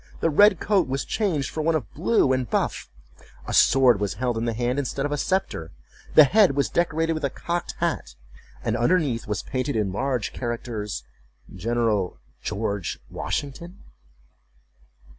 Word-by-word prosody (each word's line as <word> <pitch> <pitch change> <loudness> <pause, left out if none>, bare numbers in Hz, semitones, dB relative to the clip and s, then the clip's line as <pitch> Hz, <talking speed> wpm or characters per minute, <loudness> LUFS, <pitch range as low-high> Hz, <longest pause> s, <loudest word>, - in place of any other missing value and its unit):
The 165 - +1
red 205 +3 +6
coat 200 -7 +2
was 135 0 -2
changed 175 -11 -1
for 155 - -3
one 165 +1 +2
of 135 -10 -4
blue 160 - +2
and 130 -4 -1
buff, - - -1 0.6
a - - -5
sword 125 -5 +5
was 100 -3 -2
held 120 +2 -1
in 115 +1 -2
the 115 - 0
hand 120 +4 -1
instead 135 0 -2
of 145 - -2
a 145 - 0
sceptre, 185 - -1 0.5
the 155 - +11
head 185 0 +4
was 140 - +1
decorated 165 -1 +1
with 155 -1 -5
a 140 - +1
cocked 170 +5 -4
hat, 155 - -2 0.5
and 110 - 0
underneath 125 -2 +1
was 105 0 -2
painted 130 0 -2
in 105 -3 0
large 125 +2 -2
characters, 115 - -4 0.5
GENERAL 115 -4 0 0.9
WASHINGTON. 170 +7 -4
135 Hz, 155 wpm, -24 LUFS, 115-165 Hz, 0.9 s, the